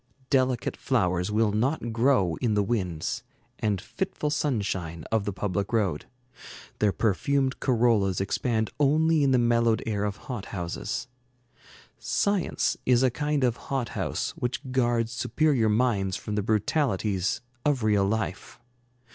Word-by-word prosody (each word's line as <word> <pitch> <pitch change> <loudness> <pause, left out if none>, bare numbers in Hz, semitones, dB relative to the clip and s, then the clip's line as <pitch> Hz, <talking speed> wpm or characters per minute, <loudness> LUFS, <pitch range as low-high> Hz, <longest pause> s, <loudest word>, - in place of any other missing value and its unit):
Delicate 130 -3 +1
flowers 90 +2 0
will 110 0 +2
not 120 +2 -1
grow 115 -8 +3
in 115 -4 0
the 105 - +3
winds 95 -7 -2 0.4
and 105 -3 0
fitful 150 - -3
sunshine 100 - -2
of 110 -2 +1
the 100 - -1
public 100 +1 -2
road. 100 -10 0 0.7
Their 105 -1 +3
perfumed 130 - 0
corollas 115 -7 +2
expand 110 +2 0
only 155 +2 +3
in 140 - +3
the 130 - +4
mellowed 115 -1 +2
air 105 -2 -1
of 100 0 -3
hot 125 -8 -5
houses. 90 +6 -4 0.9
Science 200 -3 0
is 125 0 +3
a 130 - +3
kind 150 +1 -1
of 120 -2 +2
hot 135 -4 -1
house - - -2
which 125 +1 -3
guards 120 -3 +1
superior 120 0 +1
minds 105 -4 +1
from 105 - -6
the 105 - +1
brutalities 105 - 0 0.2
of 140 -5 +1
real 105 -2 +3
life. 105 -2 -3
115 Hz, 140 wpm, -27 LUFS, 100-130 Hz, 0.9 s, the